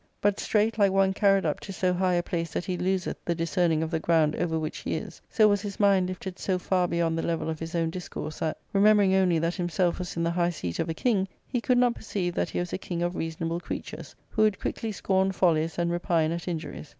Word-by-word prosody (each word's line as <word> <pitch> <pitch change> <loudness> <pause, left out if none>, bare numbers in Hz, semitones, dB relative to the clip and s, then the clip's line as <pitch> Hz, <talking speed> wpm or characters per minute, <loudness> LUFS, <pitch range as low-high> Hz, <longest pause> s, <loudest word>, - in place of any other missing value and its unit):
But 205 -1 +1
straight, 220 +1 +1
like 200 -2 +5
one 195 0 +3
carried 195 -1 +3
up 150 - 0
to 195 - -8
so 185 -1 0
high 180 0 +1
a 175 - +1
place 165 -1 -3
that - - -2
he 185 - -2
loseth 185 +1 -2
the 170 - -1
discerning 165 -1 +1
of 160 - -4
the 160 - 0
ground 160 -2 +2
over 165 -2 0
which 155 0 -4
he - - -3
is, - - -7
so 215 -2 +5
was 205 -1 +2
his 200 -2 -6
mind 195 -3 +4
lifted 185 0 -6
so 190 -2 0
far 180 0 +1
beyond 170 -1 0
the 165 - -1
level 165 -1 -1
of 160 - -6
his 165 +1 -5
own 165 -1 0
discourse 170 -3 -6
that, 160 -1 -1 0.2
remembering 205 -1 +5
only 185 -3 +3
that 165 +2 0
himself 175 -1 0
was 180 -1 -5
in 170 - 0
the 170 - +1
high 175 0 +1
seat 90 - -5
of 165 - -1
a 160 - -2
king, 200 -4 +1 0.2
he 245 -3 -2
could 250 +1 +2
not 245 -1 +4
perceive 190 -6 -3
that - - -1
he - - -5
was 175 -1 -2
a - - -2
king 175 -2 -3
of 175 +1 -1
reasonable 165 +1 -3
creatures, - - -7 0.2
who 215 - 0
would 215 -2 +3
quickly 225 - -3
scorn 190 -1 +1
follies 165 -3 +1
and 170 0 0
repine 170 -2 +1
at 170 +1 -4
injuries. 160 -3 -5
175 Hz, 250 wpm, -27 LUFS, 165-195 Hz, 0.2 s, like